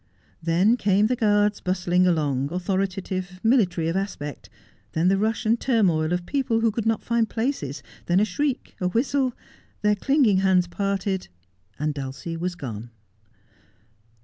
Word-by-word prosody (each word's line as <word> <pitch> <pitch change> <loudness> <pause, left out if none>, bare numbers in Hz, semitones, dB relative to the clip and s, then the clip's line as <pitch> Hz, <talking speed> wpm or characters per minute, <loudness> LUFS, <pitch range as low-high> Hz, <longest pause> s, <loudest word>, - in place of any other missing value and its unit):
Then 180 +8 +3
came 200 -1 +3
the 250 +3 +1
guards 210 -2 +2
bustling 180 0 +1
along, 145 -5 0
authoritative, 185 0 -2
mili 225 -5 +4
tary 165 -2 -3
of 165 - -1
aspect; 150 -8 -4 0.4
then 165 +3 +2
the 195 - +3
rush 220 +3 0
and 230 +2 +2
turmoil 180 -11 +2
of 180 0 -1
people 255 -4 0
who 225 -1 +3
could 225 +1 -2
not 225 -1 +1
find 235 -1 +1
places; 225 - -3 0.2
then 175 +2 +3
a 210 - +4
shriek, 270 +6 -2
a 180 - +2
whistle 255 +5 +1 0.2
— - - -33
their 210 0 +4
clinging 255 -2 +3
hands 190 -2 +3
parted 195 +1 -2 0.3
— 90 +1 -41
and 150 0 0
Dulcie 135 +3 -5
was 175 +2 -3
gone. 120 -7 -7
190 Hz, 160 wpm, -24 LUFS, 170-225 Hz, 0.4 s, mili